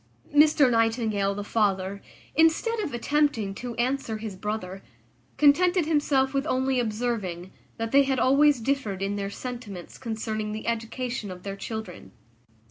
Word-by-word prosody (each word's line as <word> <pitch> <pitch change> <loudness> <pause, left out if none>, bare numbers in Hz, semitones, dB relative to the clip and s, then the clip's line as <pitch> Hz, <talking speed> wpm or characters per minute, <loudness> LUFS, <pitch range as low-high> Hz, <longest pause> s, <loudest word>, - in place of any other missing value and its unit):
Mr 300 -1 +6
Nightingale, 225 -3 +1
the 205 - -4
father, 200 -2 0 0.3
instead 325 +9 +3
of 370 -9 -2
attempting 240 -4 0
to 240 +3 -6
answer 245 -2 -1
his 215 -2 -6
brother, 195 -1 -4 0.6
contented 350 +4 +4
himself 285 -4 +2
with 275 +2 0
only 260 -1 +1
observing, 215 -6 -2 0.3
that 225 0 -3
they 280 - +6
had 270 -1 +1
always 275 +1 +4
differed 220 -7 -1
in 200 +1 -1
their 200 -1 -3
sentiments 220 -6 -7
concerning 215 -2 -3
the 215 - -6
education 230 -1 -3
of 180 -1 -9
their 195 -1 -5
children. 200 - -7
230 Hz, 140 wpm, -26 LUFS, 205-275 Hz, 0.6 s, Mr